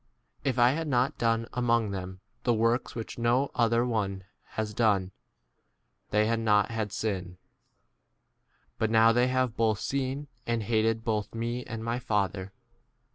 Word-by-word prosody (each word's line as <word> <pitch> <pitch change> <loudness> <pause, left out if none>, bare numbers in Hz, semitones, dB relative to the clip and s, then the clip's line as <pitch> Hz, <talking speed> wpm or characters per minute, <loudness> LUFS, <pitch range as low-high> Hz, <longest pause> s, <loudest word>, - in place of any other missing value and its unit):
If 130 -2 0
I 120 0 +6
had 160 +3 -2
not 130 +2 +1
done 115 -1 +1
among 120 -3 +1
them 95 -1 -6 0.2
the 120 - +2
works 115 +3 +1
which 115 0 -6
no 120 +4 +2
other 115 0 +2
one 100 -5 -1 0.3
has 110 -1 -2
done, 100 -5 +2 1.0
they 105 +1 +3
had 115 +1 +1
not 105 -1 +3
had 110 -3 -2
sin; 95 -4 -3 1.4
but 110 - +1
now 115 0 +6
they 120 +2 +3
have 130 -2 0
both 110 -3 +1
seen 135 +1 -2 0.2
and 115 -2 0
hated 115 +1 +1
both 110 -1 -1
me 120 +2 -2
and 115 0 -6
my 115 +2 -1
25 - - -17
Father. 100 -2 -1
115 Hz, 155 wpm, -28 LUFS, 105-120 Hz, 1.4 s, I